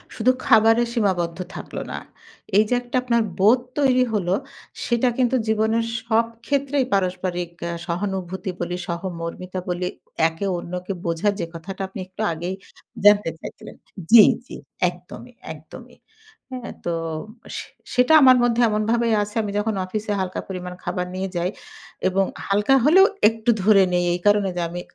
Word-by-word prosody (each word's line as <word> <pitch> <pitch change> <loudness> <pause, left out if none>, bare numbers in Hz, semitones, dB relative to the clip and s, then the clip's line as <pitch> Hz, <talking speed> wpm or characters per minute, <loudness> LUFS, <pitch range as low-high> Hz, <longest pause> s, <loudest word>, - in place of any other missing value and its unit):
শুধু 250 +3 +3
খাবারে 225 0 +5
সীমাবদ্ধ 180 -7 0 0.2
থাকল - - -8 0.2
না। - - -4 0.6
এই 215 - +7
যে - - +1
একটা 245 +1 -7
আপনার 235 -2 +2 0.2
বোধ 220 +6 +5 0.2
তৈরি 255 -3 +4
হল, 200 -5 -1 0.6
সেটা 240 +1 +2
কিন্তু 255 0 +2
জীবনের 220 +1 +1 0.2
সব 230 0 +2 0.2
ক্ষেত্রেই 280 -1 0
পারস্পরিক 180 -2 -1 0.2
অ্যা 170 - -3
সহানুভূতি 190 +1 -3
বলি, 175 0 -2
সহমর্মিতা 175 +1 -5
বলি, 180 0 -1 0.4
একে 165 +5 -5
অন্যকে 180 +2 -5
বোঝার 170 +5 +1
যে 170 - -1
কথাটা 190 +4 -7
আপনি 190 - -9
একটু 190 +3 -8
আগেই 175 +4 -4 0.5
জানতে 205 -3 +6
চাইছিলেন - - -10 0.4
জ্বি, 225 -2 +10 0.2
জ্বি - - -10 0.3
একদমই, 180 +8 -12 0.2
একদমই। - - -13 0.5
হ্যাঁ? 250 -2 -6
তো 170 - -1 0.6
সে - - -6 0.3
সেটা 250 +5 +4
আমার 255 -1 +8
মধ্যে 240 0 +2
এমনভাবেই 225 +2 +1
আছে, 210 +2 -6
আমি 210 - -3
যখন 210 +1 -1
অফিসে 210 +2 -3
হালকা 185 0 -3
পরিমাণ 180 -1 -6
খাবার 180 0 -2
নিয়ে 190 +1 -3
যাই 175 +1 0 0.6
এবং 195 +1 +2 0.2
হালকা 205 +6 +3
হলেও 375 +6 +7 0.2
একটু 225 +1 0
ধরে 200 -2 +6
নেই 175 0 +2
এই 175 - -3
কারণে 205 -1 +4
যে, - - -1
আমি 175 +1 -6
200 Hz, 150 wpm, -22 LUFS, 180-230 Hz, 0.6 s, জ্বি